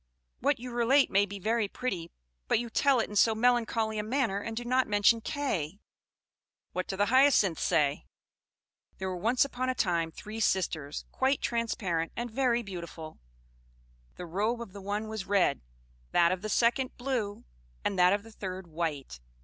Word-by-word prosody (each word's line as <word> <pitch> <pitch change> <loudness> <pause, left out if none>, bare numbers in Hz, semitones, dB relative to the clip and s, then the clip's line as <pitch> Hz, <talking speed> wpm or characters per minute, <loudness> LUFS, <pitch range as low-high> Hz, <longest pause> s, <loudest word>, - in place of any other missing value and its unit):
"What 285 +2 +2
you 250 +1 -7
relate 240 +4 +3
may 200 +1 +3
be 200 - -7
very 220 +2 0
pretty, 190 -7 -4 0.4
but - - +3
you 235 0 -4
tell 275 +1 +3
it 225 - 0
in 210 - -9
so 220 +2 +4
melancholy 225 -2 +1
a - - -1
manner, 225 -3 0
and 225 +2 -5
do 240 - -3
not 255 +1 +2
mention 205 +2 +4
Kay." 210 - -2 0.9
What 185 - -2
do 190 - -4
the 205 - +3
Hyacinths 255 - +4
say? 145 0 +1 0.9
"There 190 0 -3
were 185 - -3
once 230 +9 +2
upon 255 -2 -3
a 255 - 0
time 170 -6 +1
three 215 +7 -8
sisters, 160 -8 -1
quite 265 +1 +1
transparent, 195 -8 -1
and 240 0 -4
very 240 -1 +1
beautiful. 170 -5 -8 1.0
The 180 - -7
robe 210 +8 -1
of 230 -5 -8
the 200 - -9
one 205 +2 -3
was 215 -3 -5
red, 195 -9 +2 0.5
that 170 -1 +5
of 185 -1 -2
the 215 - -4
second 245 +4 +1
blue, 245 -6 -3 0.4
and 195 -2 0
that 180 0 +6
of 200 0 0
the 225 - -13
third 190 -3 -6
white. 155 - -4
215 Hz, 175 wpm, -29 LUFS, 185-240 Hz, 1.0 s, that